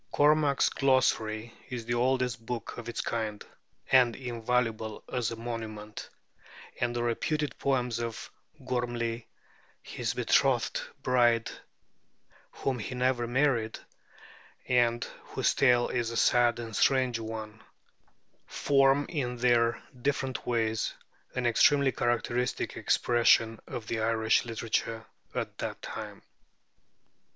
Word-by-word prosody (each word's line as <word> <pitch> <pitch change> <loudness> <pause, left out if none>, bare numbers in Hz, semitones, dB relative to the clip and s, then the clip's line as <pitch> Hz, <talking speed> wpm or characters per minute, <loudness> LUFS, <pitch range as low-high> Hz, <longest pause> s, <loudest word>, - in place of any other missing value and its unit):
Cormac's 145 -1 +4
'Glossary' 115 -4 +1 0.2
is 120 -3 -5
the 120 - -1
oldest 125 -1 0
book 120 0 -5
of 120 - -7
its 120 - -2
kind, 110 -3 -3 0.5
and 125 -3 +5
invaluable 115 -3 -2
as 125 -3 0
a 115 - -5
monument; 110 -2 -6 0.7
and 120 -1 0
the 120 - -1
reputed 145 +4 -1
poems 125 -4 0
of 115 -1 -5 0.3
Gorm'ly, 120 -2 -2 0.6
his - - -3
betrothed - - +2 0.2
bride, 120 -2 +3 1.0
whom 130 -3 -3
he 120 +4 -5
never 125 -1 +1
married, 120 -3 +1 0.9
and 120 -1 +2 0.2
whose - - 0
tale 125 -3 +4
is 120 -2 -1
a 115 - -4
sad 120 -1 +4
and 115 -2 -6
strange 130 -2 +2
one, 110 -1 -7 0.9
form 135 0 +3
in 125 -7 -3
their 120 -1 +2 0.2
different 135 -1 -2
ways 110 -2 0 0.4
an 125 - -1
extremely 135 +3 +4
characteristic 120 +1 -1
expression 115 -1 +3
of 115 - -6
the 110 0 -2
Irish 110 0 +2
literature 115 -1 -2 0.3
of - - -1
the - - -4
time. - - -7
120 Hz, 115 wpm, -29 LUFS, 115-125 Hz, 1.0 s, and